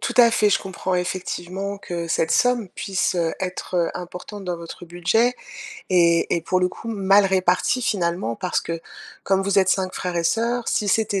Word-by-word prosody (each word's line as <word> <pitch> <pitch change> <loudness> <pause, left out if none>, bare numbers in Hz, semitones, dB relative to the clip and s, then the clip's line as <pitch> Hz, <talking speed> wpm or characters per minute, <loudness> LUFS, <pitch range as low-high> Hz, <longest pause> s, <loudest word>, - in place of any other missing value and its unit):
Tout - - -2
à 235 -1 +8
fait. 210 -2 +3
Je - - +4
comprends 190 -1 -3
effectivement 185 +2 -3
que 170 -3 -5
cette 160 0 +1
somme 245 -5 +2
puisse 190 -2 -1 0.2
être, 185 -1 -4
heu, 170 -1 +2
importante 180 +3 -8
dans 180 -1 -2
votre 170 +1 -9
budget 180 +8 +1 0.6
et 170 -2 +4
et - - -1
pour 185 +3 0
le 180 - +3
coup, 225 - -9
mal 200 -2 +4
répartie, 190 +6 +2
finalement, 170 - -1
parce 180 - -1
que 165 0 -5 0.4
comme 195 0 +2
vous 200 0 +2
êtes 190 - +3
5 190 -1 +1
frères 180 -1 -3
et 170 - 0
sœurs, 235 +4 0
si 210 - 0
c'était 200 -1 +1
185 Hz, 185 wpm, -22 LUFS, 175-205 Hz, 0.6 s, à